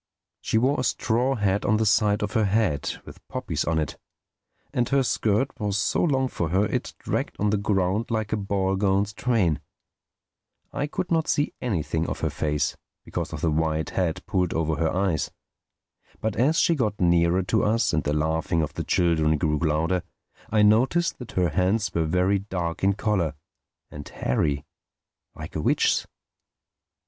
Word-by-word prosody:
She - - 0
wore 130 +5 +2
a - - 0
straw 125 +2 +1
hat 100 -2 0
on 110 - +2
the 110 - +1
side 105 0 +3
of 105 - -2
her 110 -3 +2
head 100 -7 0
with - - -12
poppies - - -3
on 80 - 0
it; 75 -3 -2 0.7
and 120 -1 0
her 135 -1 +3
skirt 115 +2 +1
was 105 -2 -1
so 105 - +1
long 135 -5 +2
for 85 -9 -3
her 95 +5 +2
it - - -3
dragged - - -3
on 105 0 +1
the 105 - +2
ground 100 +1 0
like 110 -2 -1
a - - +1
ball 100 -1 0
gown's 100 +1 +1
train. 105 -9 +1 1.1
I 145 - -1
could 170 +4 -4
not 165 -1 +2
see 145 - +1
anything 85 -7 -1
of - - -4
her - - 0
face 75 -1 -1 0.3
because - - -4
of - - -6
the 85 -2 +1
wide 80 0 0
hat 90 -4 -1
pulled 90 -4 0
over 80 -1 0
her 80 -1 +1
eyes. 90 -5 0 0.9
But 110 -1 -2
as 145 +7 +2
she 170 - +4
got 110 -9 -1
nearer 85 +1 +3
to 95 +5 +1
us 110 -1 +2
and 80 - +1
the 75 - -1
laughing 80 +2 0
of 75 - -4
the - - -3
children 80 -3 +2
grew 75 0 0
louder, 80 +3 +1 0.5
I 105 -1 +3
noticed 130 +11 +3
that 125 - -9
her 90 -2 +2
hands 95 +4 +1
were 85 -1 +1
very 90 +4 +2
dark 90 -4 -4
in 100 +1 +4
color, 95 -6 0 0.6
and 75 -1 -8
hairy, 70 +3 -1 0.7
like - - -9
a - - -1
witch's. - - +2
95 Hz, 175 wpm, -25 LUFS, 80-110 Hz, 1.1 s, she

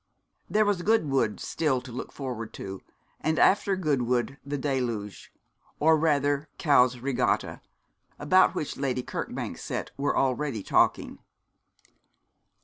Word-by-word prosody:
There 215 0 +3
was 205 -3 +1
Goodwood 145 - +1
still 150 -6 0
to 130 - -11
look 125 - -6
forward 125 -5 -6
to; 95 -1 -7 0.4
and 155 0 0
after 200 0 +4
Goodwood 135 -6 0
the 145 +1 -3
Deluge 125 -7 -3 0.5
or 160 +1 +5
rather 145 -2 +1
Cowes 125 -4 +4
Regatta, 130 +1 -1 0.6
about 165 +6 +4
which 150 - -3
Lady 130 -2 -1
Kirkbank's - - -5
set - - -4
were 140 +1 0
already 130 -4 0
talking. - - +1
140 Hz, 120 wpm, -27 LUFS, 125-155 Hz, 0.6 s, or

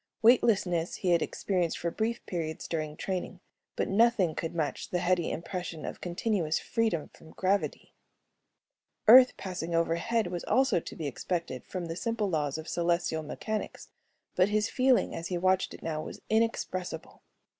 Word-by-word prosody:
Weightlessness 200 -8 +3
he 185 - -1
had 170 -1 +4
experienced 180 -2 -1
for 170 - -2
brief 230 +4 -2
periods 160 -3 -4
during 155 -2 -3
training, 185 0 -4 0.4
but - - 0
nothing 205 -5 +3
could 165 +2 -4
match 155 -3 -2
the 180 - 0
heady 175 -1 +1
impression 170 -1 -5
of - - -6
continuous 175 -2 0
freedom 220 -10 -1
from 160 - -16
gravity. 195 +2 -1 1.1
Earth 250 +3 +9
passing 180 -3 -4
overhead 170 +7 +1
was 175 -1 -4
also 260 -3 +3
to - - -9
be 160 - -5
expected 145 -1 -3
from 180 -2 -4
the 165 0 -4
simple 220 0 -1
laws 150 -3 0
of 160 +1 -7
celestial 170 -2 0
mechanics 215 +7 -5 0.5
but 185 +2 +4
his 210 +1 +1
feeling 255 -1 +3
as 165 - -4
he 180 - -2
watched 185 +1 +2
it - - -11
now 155 -2 -2
was - - -8
inexpressible. 185 -7 -1
180 Hz, 155 wpm, -29 LUFS, 165-210 Hz, 1.1 s, Earth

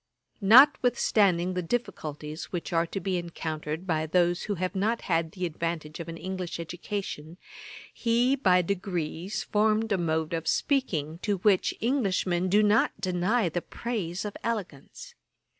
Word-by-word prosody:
Notwithstanding 215 - +5
the 180 - -1
difficulties 155 -7 -4
which 175 -1 -5
are 165 0 +2
to 195 - -4
be 185 0 -1
encountered 160 -1 -4
by 160 -3 0
those 175 +1 +2
who 205 - -2
have 185 +1 -2
not 215 +4 0
had 165 -2 -1
the 185 -1 -3
advantage 165 -1 -4
of 170 - -6
an 165 - -6
English 185 -1 -5
education, 170 -2 -5 0.6
he 240 +3 +2
by 185 -9 +3
degrees 180 0 -3
formed 215 +1 +1
a 195 - +2
mode 160 -1 -1
of 165 -1 -3
speaking 170 - 0
to 205 0 -1
which 195 0 +2
Englishmen 190 -8 +1
do 210 +3 +4
not 210 0 +2
deny 185 +3 +1
the 170 +1 -2
praise 205 -6 -4
of 205 - -5
elegance. 225 - -5
185 Hz, 145 wpm, -27 LUFS, 165-210 Hz, 0.6 s, Notwithstanding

